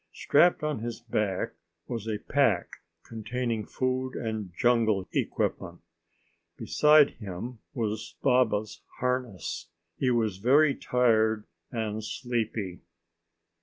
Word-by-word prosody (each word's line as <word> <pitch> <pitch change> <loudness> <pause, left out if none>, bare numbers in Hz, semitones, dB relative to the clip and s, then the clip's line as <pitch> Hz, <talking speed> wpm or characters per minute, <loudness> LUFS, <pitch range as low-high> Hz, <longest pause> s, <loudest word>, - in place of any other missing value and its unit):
Strapped 170 +2 +3
on 150 -5 -1
his 115 +1 -5
back 105 -5 -1 0.3
was 115 -3 -4
a 110 -1 -1
pack - - +1 0.3
containing 115 0 -3
food 130 0 -1
and 110 -5 -4
jungle 115 -5 +2
equipment. 85 -2 -2 0.8
Beside 150 +5 +5
him 110 +4 -6 0.2
was 110 -3 -3
Baba's 110 -5 +2 0.2
harness. 125 - -2 0.3
He 130 - +2
was 110 -6 +1
very 140 +8 +4
tired 110 -4 +2 0.3
and 110 -2 -3
sleepy. 110 -6 -3
115 Hz, 100 wpm, -28 LUFS, 105-125 Hz, 0.8 s, Beside